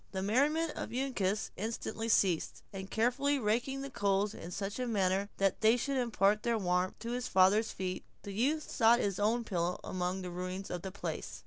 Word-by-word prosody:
The 190 0 -2
merriment 295 +10 +2
of - - -5
Uncas 225 -6 -1
instantly 225 +1 -3
ceased; 185 -7 +2
and 190 0 -6
carefully 255 +7 +1
raking 245 +4 0
the 275 0 -6
coals 200 -1 +1
in 170 - -8
such 195 +5 -4
a 250 - -1
manner 195 -2 +1
that 195 -1 +1
they 220 +2 +5
should 275 +2 -1
impart 215 -4 +2
their 235 -1 +1
warmth 180 -2 0
to 230 +1 -4
his 250 0 -2
father's 195 +3 +4
feet, 185 -1 -4 0.2
the 200 - -6
youth 290 +9 0
sought 230 -1 +4
his 200 -5 -1
own 225 +4 +2
pillow 180 -4 -1
among 185 +1 -2
the 180 - -5
ruins 185 +2 -5
of 180 - -3
the 190 - -5
place. 200 - -5
210 Hz, 195 wpm, -32 LUFS, 190-240 Hz, 0.2 s, they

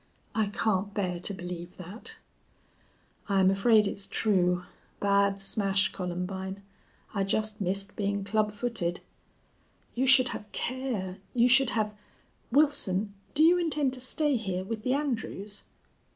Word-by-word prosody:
"I 220 -2 +1
can't 205 -1 -1
bear 180 -4 -1
to 180 - -3
believe 180 -2 -7
that." 210 - -8 1.1
"I'm 190 -1 +4
afraid 210 +2 +4
it's 200 0 -3
true. 180 -4 +1 0.4
Bad 200 0 +2
smash, 195 0 +2
Columbine! 190 +2 -4 0.5
I 200 -2 +1
just 215 +2 -1
missed 195 +2 0
being 200 -1 -1
club 210 +1 +1
footed." 210 -6 -2 0.9
"You 260 +2 0
should 260 -1 +7
have 210 0 -6
care. 235 -8 -3 0.2
You 240 0 +5
should 265 0 +5
have.... 215 -1 0 0.6
Wilson, 215 -8 +2 0.2
do 305 - +5
you 350 +2 +6
intend 300 -6 0
to 255 - -6
stay 290 +2 +1
here 190 -4 -3
with 220 +3 -4
the 255 +3 0
Andrews?" 220 -7 -3
205 Hz, 135 wpm, -29 LUFS, 190-240 Hz, 1.1 s, should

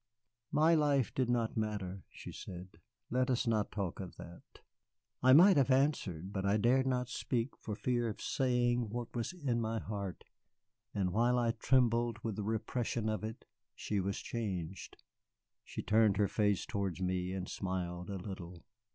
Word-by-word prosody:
"My 155 +3 +5
life 145 -5 +2
did 130 -2 0
not 120 -2 +1
matter," 100 -4 -2
she - - -9
said. 90 0 -8 0.4
"Let 125 +1 +2
us 125 -1 +1
not 110 -3 +1
talk 95 -4 -3
of 95 -3 -7
that." 85 +1 -13 0.6
I 130 - +6
might 175 +6 +8
have 135 -1 +4
answered, 110 - +1
but 95 - -2
I 100 +2 +3
dared 130 +5 +3
not 125 -1 0
speak 125 0 -2
for 105 - -5
fear 120 +1 0
of 105 - -6
saying 120 -3 +1
what 120 +2 -5
was 120 -1 -2
in 140 -10 -1
my 115 0 -1
heart. 100 -4 -5 0.7
And 90 -3 0
while 120 +3 +3
I 120 -1 +2
trembled 120 -1 +2
with 110 -3 -2
the 105 - -3
repression 110 +1 -1
of 110 0 -2
it, 110 +1 -6 0.3
she 105 - -2
was 95 +1 -1
changed. 95 -6 -4 0.7
She - - -6
turned 105 -1 +4
her 105 -1 +3
face 105 -2 +1
towards 100 -3 -2
me 90 0 -1
and 95 -1 -4
smiled 90 -1 -3
a 100 - -3
little. 90 -3 -8
110 Hz, 170 wpm, -34 LUFS, 95-125 Hz, 0.7 s, might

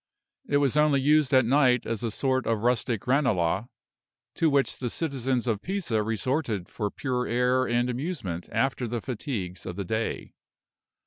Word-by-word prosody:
It 145 - +2
was 140 -1 +2
only 150 -2 +4
used 150 +1 +3
at 130 -2 +5
night 125 -1 +3
as 115 0 -2
a 115 - -1
sort 130 +3 0
of 115 -2 0
rustic 120 -2 0
Ranelagh, 120 - +1 0.7
to 165 - +2
which 140 -5 +1
the 125 - -2
citizens 130 -4 -1
of 110 -4 -1
Pisa 180 - -1
resorted 110 - -1
for 105 -3 -3
pure 125 +2 -2
air 125 +2 +2
and 120 +1 +1
amusement 125 - -4
after 130 -2 0
the 120 +1 -2
fatigues 105 - -5
of 90 - -6
the 100 0 -4
day. 110 +4 -3
125 Hz, 165 wpm, -27 LUFS, 110-135 Hz, 0.7 s, at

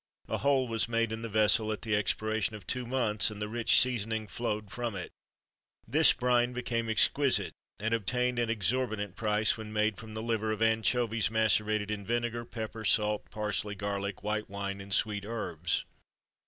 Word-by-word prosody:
A - - -2
hole 135 -2 +2
was 115 -1 -1
made 115 -1 +1
in 110 0 -4
the 115 - -5
vessel 110 +1 +3
at 110 - -5
the 110 -2 +1
expiration 110 +1 0
of 105 - -11
two 125 -2 -3
months, 115 -5 +1
and 105 -1 -8
the 105 - -2
rich 115 +1 +4
seasoning 110 -3 0
flowed 105 -2 -3
from 120 -2 -3
it.[XXIII 85 -8 -13
28] - - +2
This - - +8
brine 125 0 +2
became 115 -2 -2
exquisite, 130 +5 +2 0.3
and 110 +2 -1
obtained 125 +3 0
an 120 -1 0
exorbitant 110 -2 -1
price 110 -1 +1
when 110 -1 -7
made 110 -1 +1
from 110 -1 -9
the 110 - -4
liver 110 -2 0
of 110 - -2
anchovies 115 0 +2
macerated 110 -1 +2
in 105 -1 -3
vinegar, 120 +1 -2
pepper, 110 -1 -6
salt, 105 -1 +2
parsley, 105 -1 -2
garlic, 100 -1 -3
white 105 +1 -2
wine, 100 0 -4
and 100 0 -11
sweet 105 0 +1
herbs. 90 -6 -2
110 Hz, 180 wpm, -30 LUFS, 105-115 Hz, 0.3 s, This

